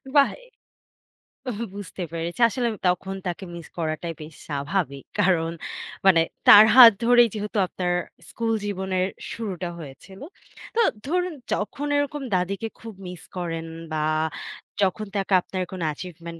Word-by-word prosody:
বাহ! 280 -1 +6 1.2
এ - - -1 0.2
বুঝতে 195 -2 -6
পেরেছি। 170 +4 -4
আসলে 240 +2 -1 0.2
তখন 185 +2 0
তাকে 175 +2 -4
miss 170 -2 -9
করাটাই 165 0 -2
বেশ 155 0 -10
স্বাভাবিক। 140 -1 -2 0.2
কারণ, 165 -3 +2 0.5
মানে 180 -4 +6 0.3
তার 210 +1 +11
হাত 245 -3 +12
ধরেই 240 -1 +6
যেহেতু 210 +1 -4
আপনার 180 0 -2 0.4
school 230 -1 -1
জীবনের 190 -2 -1 0.2
শুরুটা 185 -6 -4
হয়েছিল। 165 +6 -11 0.5
তো 470 - +4 0.2
ধরুন 360 +4 0 0.2
যখন 275 +7 -3
এরকম 285 0 -1
দাদীকে 195 +4 -1
খুব 225 -1 -9
miss 180 -1 -9
করেন 165 -2 -3 0.3
বা 155 -1 -1 0.8
যখন 200 +2 +1
তাকে 195 0 -1
আপনার 185 +1 -4
কোন 185 -1 -6
achievement 170 0 -9
185 Hz, 130 wpm, -24 LUFS, 170-215 Hz, 1.2 s, হাত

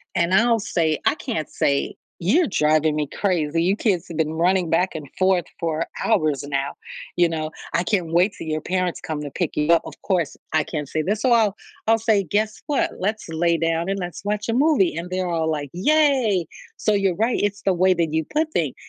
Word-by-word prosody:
and 170 +2 +1
I'll 230 +2 +4
say, 160 -6 0
I - - +3
can't 230 - -4
say, 140 0 0 0.2
"You're 245 - +3
driving 155 -3 +2
me 150 -2 -1
crazy. 165 -4 0
You 190 +3 +2
kids 185 -6 0
have 165 - -6
been 160 -1 0
running 175 +1 +2
back 175 +1 +1
and 150 -3 -6
forth 185 -1 +3 0.2
for 165 0 -1 0.2
hours 150 -4 +1
now," 140 -1 -2 0.4
you 175 -1 +3
know, 155 -1 -3 0.2
"I 170 - +2
can't 180 -4 -1
wait 180 +4 +3
till - - -7
your 155 0 -1
parents 185 -1 -1
come 155 -2 -4
to 145 - -6
pick 175 +1 -2
you 150 +2 +2
up." 165 - +4
Of - - -8
course, 180 -6 0 0.2
I 155 - +3
can't 150 -4 -4
say 155 -1 -1
this, 210 +4 -1
so 255 - +2
I'll 215 -3 +3 0.3
I'll 225 0 +4
say, 215 -3 +2
"Guess 210 +5 -1
what, 290 -2 +1
let's 210 0 -2
lay 170 +1 +1
down 165 +2 0
and 195 - -1
let's 180 +2 -6
watch 210 +1 -2
a 230 - +1
movie," 265 - +3
and 170 +2 -5
they're 185 -1 -2
all, 165 -2 0
like, 145 -2 -2
"Yay!" 250 - +2 0.3
So 215 - +1
you're 195 -3 +1
right, 225 +6 +1
it's 205 0 -1
the 195 - +2
way 185 +1 +4
that 165 -3 -1
you 160 -1 0
put 310 - -1
things. - - -1
175 Hz, 220 wpm, -22 LUFS, 160-205 Hz, 0.4 s, I'll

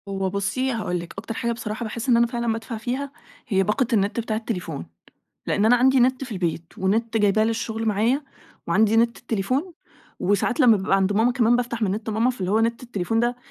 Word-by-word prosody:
هو 195 -1 -2
بصي 200 +7 -1
هاقول 210 -7 -2
لِك، 170 0 -9
أكتر 225 - -5
حاجة 235 +1 -2
بصراحة 225 0 -4
باحس 230 +3 -4
إن 235 - +5
أنا 235 0 +4
فعلًا 235 -1 -2
بادفع 225 +1 -5
فيها 260 +5 -3 0.4
هي 195 -5 +2
باقة 215 +6 0
النت 205 +1 +1
بتاع 220 -1 -2
التليفون؛ 180 - -4 0.6
لأن 205 - +1
أنا 235 +3 +6
عندي 260 +1 +4
نت 255 +2 +2
في 245 - -8
البيت 170 -3 -3
ونت 225 +4 0
جايباه 210 0 +3
للشغل 225 0 -2
معايا 225 +7 +1 0.4
وعندي 215 +5 +3
نت 235 +1 +2
التليفون 255 - -2 0.5
وساعات 205 - +1
لمّا 240 -5 +6
بابقى 195 0 +1
عند 195 +1 +1
ماما 225 +4 +3
كمان 240 -1 +3
بافتح 240 -1 -3
من 205 - +2
نت 215 +3 -3
ماما 225 +4 +2
فاللي 190 -7 -4
هو 220 - +3
نت 230 +1 0
التليفون 225 -2 -1
ده 240 +1 0
225 Hz, 205 wpm, -23 LUFS, 200-240 Hz, 0.6 s, أنا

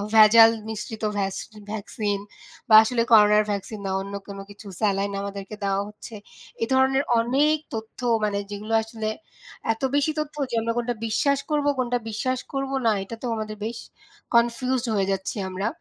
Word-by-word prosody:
ভেজাল 225 +1 +8 0.2
মিশ্রিত 220 0 -6
ভ্যাস 195 -1 -1 0.4
ভ্যাকসিন 205 -1 -2 0.5
বা 215 - +8
আসলে 230 +1 0
করোনার 210 -1 +7
ভ্যাকসিন 205 +1 -4
বা 190 - -1
অন্য 200 +1 -7
কোনো 200 -1 -7
কিছু, 205 +1 -12
স্যালাইন 200 -1 +1
আমাদেরকে 200 +1 -6
দেওয়া 195 0 +1
হচ্ছে। 215 +2 -11 0.5
এ - - +3
ধরনের 265 +1 +3 0.2
অনেক 280 +7 +2 0.2
তথ্য 220 +2 -6 0.2
মানে 205 -1 0
যেগুলো 210 +2 -5
আসলে 220 -1 -4 0.6
এত 225 - -16
বেশি 290 +2 +2
তথ্য 305 0 -4 0.2
যে - - -1
আমরা 230 0 -1
কোনটা 240 0 -1
বিশ্বাস 280 +5 +1
করব, 295 -1 +1
কোনটা 245 -1 0
বিশ্বাস 255 +4 -1
করব 270 0 -2
না, 225 - +5
এটা 230 - -7
তো - - -5
আমাদের 215 -1 -5
বেশ 225 +1 -4 0.6
কনফিউজড 240 +2 +2
হয়ে 195 -1 +1
যাচ্ছি 190 +2 -3
আমরা। 190 +3 -2
220 Hz, 165 wpm, -24 LUFS, 205-245 Hz, 0.6 s, ভেজাল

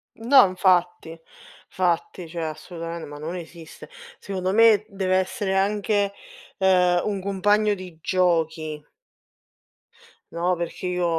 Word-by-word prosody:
No, 250 +2 +6
infatti. 180 -3 0 0.5
Fatti, 175 -1 -1
cioè 170 +1 -6
assolutamen 165 +1 -6
ma 145 0 -9
non 160 +4 -5
esiste. 165 -2 -11 0.3
Secondo 185 -1 -3
me 215 -1 +5
deve 190 -2 -1
essere 190 +1 -1
anche, 205 +1 +1 0.5
ehm, 180 -2 +3
un 200 -2 -2
compagno 205 +2 +1
di 185 -3 -11
giochi. 160 -4 0 1.5
No, 175 +2 0
perché 170 +1 -5
io 180 0 -1
185 Hz, 115 wpm, -23 LUFS, 170-200 Hz, 1.5 s, No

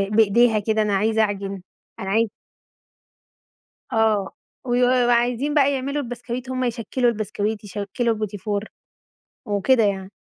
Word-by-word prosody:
بإيديها 225 +1 +4
كده، 220 +1 0
أنا 210 -1 0
عايزة 220 +2 +2
اعجن، 200 -2 -2 0.4
أنا 190 - -4
عاي 225 +1 +2 1.6
آه 215 -3 +2 0.4
ويو 245 0 +3 0.2
وعايزين 245 +4 +1
بقى 285 -2 +4
يعملوا 280 +2 -2
البسكويت، 245 +1 -6
هُم 255 0 -1
يشكّلوا 240 +1 0
البسكويت، 215 -1 -3
يشكّلوا 205 +3 -2
البُتيفور، 205 0 -3 0.8
وكده 220 +4 +3
يعني. 195 -1 -2
220 Hz, 115 wpm, -22 LUFS, 205-245 Hz, 1.6 s, بإيديها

